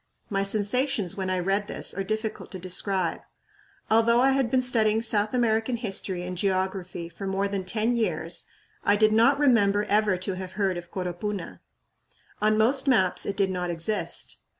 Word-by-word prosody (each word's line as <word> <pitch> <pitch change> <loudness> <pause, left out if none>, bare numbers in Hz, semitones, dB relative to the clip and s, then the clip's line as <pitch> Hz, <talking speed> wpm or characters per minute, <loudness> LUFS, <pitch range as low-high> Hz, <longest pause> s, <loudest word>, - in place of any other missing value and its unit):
My 195 -1 +1
sensations 210 +1 0
when 190 -1 -3
I 185 - 0
read 195 +3 0
this - - -1
are 195 - -3
difficult 215 +2 -4
to - - -4
describe. 185 0 -2 0.7
Although 230 +2 +4
I 265 +2 +4
had 265 -3 +1
been 255 +1 +2
studying 225 -3 +2
South 210 -2 +2
American 235 -1 +1
history 195 -5 -3
and 180 0 -5
geography 185 -2 -2
for 170 +4 -7
more 195 +1 0
than 200 -2 -3
ten 220 +5 0
years, 230 -2 -1 0.4
I 205 - +4
did 215 +1 +4
not 235 +6 +4
remember 210 -8 +3
ever 210 -2 +2
to 185 +2 -3
have 185 0 -7
heard 195 -2 0
of 175 0 -7
Coropuna. 185 +2 -5 0.8
On 215 0 +3
most 260 +6 +3
maps 190 -9 +3
it 200 - -3
did 195 -2 +2
not 180 -1 -3
exist. 175 +5 -3
205 Hz, 175 wpm, -26 LUFS, 185-225 Hz, 0.8 s, Although